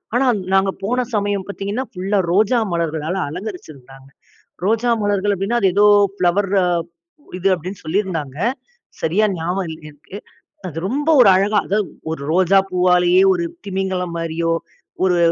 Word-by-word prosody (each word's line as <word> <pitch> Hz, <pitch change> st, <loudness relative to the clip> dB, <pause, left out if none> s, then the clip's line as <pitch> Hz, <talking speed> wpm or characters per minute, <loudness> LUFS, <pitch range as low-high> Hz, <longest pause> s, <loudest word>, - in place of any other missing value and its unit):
ஆனா 260 Hz, +2 st, +3 dB, 0.3 s
நாங்க 195 Hz, 0 st, +3 dB
போன 245 Hz, +4 st, 0 dB
சமயம் 205 Hz, -2 st, -1 dB
பார்த்தீங்கன்னா, 200 Hz, +6 st, -3 dB
ஃபுல்லா 195 Hz, +2 st, -1 dB
ரோஜா 220 Hz, +5 st, +3 dB
மலர்களால 160 Hz, 0 st, -2 dB
அலங்கரிச்சு 180 Hz, +2 st, -7 dB
இருந்தாங்க. 135 Hz, +1 st, -16 dB, 0.6 s
ரோஜா 225 Hz, +3 st, +1 dB
மலர்கள் 205 Hz, 0 st, +1 dB
அப்படீன்னா, 205 Hz, +6 st, -1 dB
அது 190 Hz, -, +4 dB
ஏதோ 205 Hz, +1 st, +5 dB, 0.3 s
ஃபிளவர் 185 Hz, +1 st, +1 dB, 0.9 s
இது 190 Hz, -, 0 dB
அப்படீன்னு 180 Hz, +3 st, -8 dB
சொல்லியிருந்தாங்க. 160 Hz, -6 st, -2 dB, 0.6 s
சரியா 190 Hz, +7 st, +2 dB
ஞாபகம் 180 Hz, +3 st, -2 dB
இல்ல 160 Hz, -, -7 dB
எனக்கு. 155 Hz, +7 st, -12 dB, 0.5 s
அது 165 Hz, -3 st, -8 dB
ரொம்ப 290 Hz, +7 st, -1 dB
ஒரு 200 Hz, -, +7 dB
அழகா 205 Hz, +2 st, +2 dB
அதாவது 205 Hz, 0 st, 0 dB, 0.2 s
ஒரு 160 Hz, -, -5 dB
ரோஜா 185 Hz, +2 st, +4 dB
பூவாலேயே 180 Hz, 0 st, +3 dB
ஒரு 170 Hz, -1 st, -2 dB, 0.2 s
திமிங்கலம் 190 Hz, -2 st, -2 dB
மாரியோ, 165 Hz, 0 st, -2 dB, 0.5 s
ஒரு 180 Hz, -2 st, +3 dB
190 Hz, 135 wpm, -19 LUFS, 170-205 Hz, 0.9 s, ஒரு